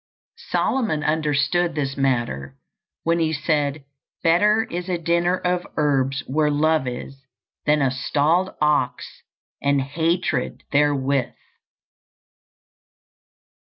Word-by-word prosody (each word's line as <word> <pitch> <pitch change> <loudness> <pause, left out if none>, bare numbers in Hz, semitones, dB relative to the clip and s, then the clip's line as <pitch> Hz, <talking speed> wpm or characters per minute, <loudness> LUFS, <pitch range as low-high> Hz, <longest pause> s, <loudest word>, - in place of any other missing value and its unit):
Solomon 215 - 0
understood 155 +2 +1
this 135 -3 -2
matter 120 - -1 0.5
when 170 +1 +1
he 160 -1 +1
said, 145 -1 -1 0.4
"Better 210 +7 +4
is 175 -1 -5
a 180 - 0
dinner 170 +2 +1
of 180 -1 -1
herbs 135 -2 +1
where 150 +3 +1
love 155 -1 +2
is, 135 +2 -7 0.4
than 150 -1 +3
a 130 - +2
stalled 155 +7 +1
ox 150 -4 0 0.4
and 140 0 +2
hatred 160 +1 -1
therewith." 140 -2 +1
150 Hz, 100 wpm, -22 LUFS, 135-170 Hz, 0.5 s, Better